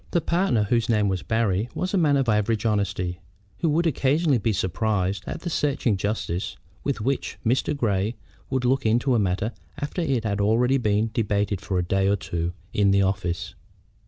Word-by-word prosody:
The 175 - +2
partner, 165 - +1
whose 115 +3 +1
name 105 -3 +3
was 95 -2 -1
Barry, 110 -1 0
was 185 +1 -2
a - - +3
man 145 -4 +3
of 135 -2 +1
average 105 0 +1
honesty, 100 -4 0 0.4
who 165 - +1
would 165 +3 +2
occasionally 145 -1 +2
be 110 +1 +1
surprised 95 0 0
at - - -5
the 175 - -3
searching 135 -8 +1
justness 95 -3 -2 0.3
with 140 -6 -1
which 135 +4 -2
Mr. 130 +5 +1
Grey 105 -2 0 0.3
would 130 -2 -1
look 130 +2 +2
into 120 +4 +2
a 120 - +3
matter 100 +3 0 0.3
after 145 +5 -3
it 135 -8 0
had 105 -2 -1
been - - +2
already 125 +5 +3
debated 105 -2 0
for 95 -2 -2
a 90 - +1
day 95 +2 +1
or 100 - +3
two 85 -3 -3 0.2
in 100 -1 +3
the 100 0 +4
office. 95 -2 -2
110 Hz, 190 wpm, -25 LUFS, 100-130 Hz, 0.4 s, the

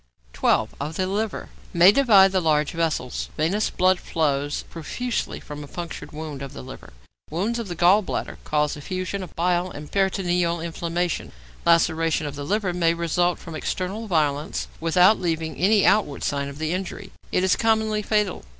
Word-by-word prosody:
12. - - +1
=Of 150 +3 -4
the 185 - 0
Liver.= 205 +3 -3 0.3
May 175 +3 +8
divide 205 -7 +6
the 190 -1 +1
large 150 -3 +2
vessels. 165 -6 -2
Venous 185 +8 +1
blood 185 0 +2
flows 145 -2 -1
profusely 235 +9 -4
from 150 0 -8
a - - -9
punctured 170 +3 -7
wound 150 -2 -6
of 135 - -7
the 60 - -8
liver. - - -11 0.4
Wounds 205 +9 -1
of 230 - -4
the 175 - -5
gall 180 +5 +5
bladder 190 - -4
cause 150 -1 0
effusion 185 +6 -4
of 180 - -9
bile 175 +1 +1
and 150 -3 -9
peritoneal 180 -3 +1
inflammation. 170 +1 -2 0.4
Laceration 165 -1 +3
of 145 - -4
the 145 - -5
liver 200 0 0
may 170 -1 +2
result 170 +1 +1
from 165 - -10
external 190 +7 -3
violence 150 -4 0
without 180 +6 +4
leaving 165 -2 -2
any 200 +3 +4
outward 195 -9 +2
sign 140 -1 -1
of 140 - -10
the 160 +2 -2
injury; 190 +1 -5 0.2
it 180 - +1
is 190 - +4
commonly 220 -1 +1
fatal. 210 -2 0
175 Hz, 170 wpm, -24 LUFS, 155-190 Hz, 0.4 s, May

